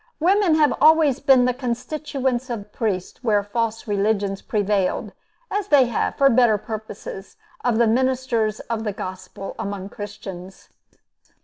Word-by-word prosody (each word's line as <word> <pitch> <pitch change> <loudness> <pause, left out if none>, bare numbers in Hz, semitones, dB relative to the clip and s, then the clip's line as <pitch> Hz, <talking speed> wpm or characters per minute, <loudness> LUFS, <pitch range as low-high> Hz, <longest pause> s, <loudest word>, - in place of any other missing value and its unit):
Women 365 0 +3
have 300 -2 +4
always 305 -3 +5
been 265 -3 +5
the 250 - +2
constituents 255 +1 -3
of 210 -3 -5
priests 200 -1 -3
where 210 -4 +2
false 225 +2 -2
religions 200 -1 0
prevailed, 205 -5 0 0.4
as 410 -1 -1
they 285 -8 +6
have, 235 - -1
for 275 - +4
better 240 -4 +4
purposes, 215 -3 -8 0.3
of 245 -3 +1
the 235 - +4
ministers 240 -2 +1
of 230 -1 -4
the 210 -2 -2
Gospel 185 +1 -7
among 200 -2 -4
Christians. 195 -3 -9
230 Hz, 135 wpm, -22 LUFS, 205-260 Hz, 0.4 s, they